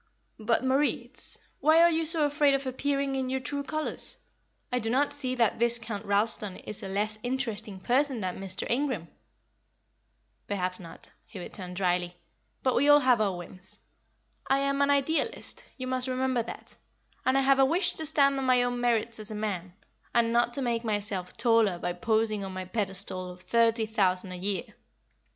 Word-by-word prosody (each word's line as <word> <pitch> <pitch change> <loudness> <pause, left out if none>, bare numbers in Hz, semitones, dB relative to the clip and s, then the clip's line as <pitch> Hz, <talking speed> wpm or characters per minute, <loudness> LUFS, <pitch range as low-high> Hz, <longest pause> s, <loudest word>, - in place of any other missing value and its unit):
"But, 225 +3 +1
Moritz, 270 +3 -1 0.2
why 315 +2 +5
are 340 0 +6
you 325 0 0
so 320 -2 +1
afraid 290 -1 +3
of 275 0 -3
appearing 275 +1 -1
in 265 -1 -1
your 265 0 -1
true 285 +2 -4
colours? 310 +2 -5 0.5
I 250 - +1
do 225 -1 -3
not 285 +4 +1
see 255 -3 -1
that 230 -4 +2
Viscount 235 -3 0
Ralston 205 -1 0
is 210 - -6
a - - -5
less 210 +2 -1
interesting 225 -5 -3
person 260 +5 +1
than 185 -1 -3
Mr. 190 -1 -4
Ingram." 245 - -1 1.4
"Perhaps 185 -2 -2
not," 170 -3 -10 0.2
he 210 - -11
returned, 180 0 -7
drily; 180 -1 0 0.5
"but 260 - +2
we 285 +3 +3
all 290 0 +8
have 250 -4 +4
our 195 -4 0
whims. 180 +1 -9 0.7
I 270 - +3
am 275 0 0
an 280 - +3
Idealist, 285 +3 0
you 255 - -5
must 255 0 -1
remember 255 -1 0
that, 230 - -9 0.5
and 260 +1 +2
I - - +4
have 270 0 +4
a - - +7
wish 340 +8 +2
to 315 - 0
stand 280 -2 +3
on - - -2
my 250 -1 +4
own 245 0 -2
merits 230 -2 +1
as 215 0 -5
a 215 - -5
man, 190 -4 -3 0.4
and 230 -1 +3
not 240 0 +3
to 275 - -2
make 235 -1 -1
myself 205 -4 -2
taller 225 -5 +3
by 175 0 -2
posing 215 +2 +1
on 190 -1 -6
my 185 0 -5
pedestal 185 -2 -3
of 180 0 -11
thirty 230 -1 +2
thousand 190 -4 0
a - - -5
year. 190 0 -1
230 Hz, 180 wpm, -28 LUFS, 200-270 Hz, 1.4 s, all